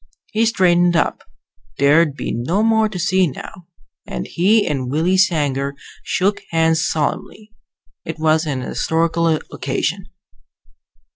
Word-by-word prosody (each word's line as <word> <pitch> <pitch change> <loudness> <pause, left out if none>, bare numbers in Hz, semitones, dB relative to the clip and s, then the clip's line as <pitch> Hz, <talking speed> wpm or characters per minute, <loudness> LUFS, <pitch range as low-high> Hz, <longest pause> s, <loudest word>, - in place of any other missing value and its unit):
He 225 +1 +2
straightened 175 -5 +3
up 165 - 0 0.6
there'd 145 +1 +3
be - - -4
no 160 - -1
more 220 -1 +3
to 200 - -6
see 185 0 +2
now 165 +5 -9 0.4
and 60 -1 -5
he 205 +5 +2
and 135 -5 -2
Willie 160 +7 +1
Sanger 145 -7 +1 0.3
shook 200 +2 0
hands 160 0 +2
solemnly. 210 +7 -3 0.5
It 165 - -6
was 155 0 +1
an 135 -3 -2
historical 165 +5 0 0.3
occasion. 180 +8 -3
165 Hz, 125 wpm, -19 LUFS, 150-190 Hz, 0.6 s, straightened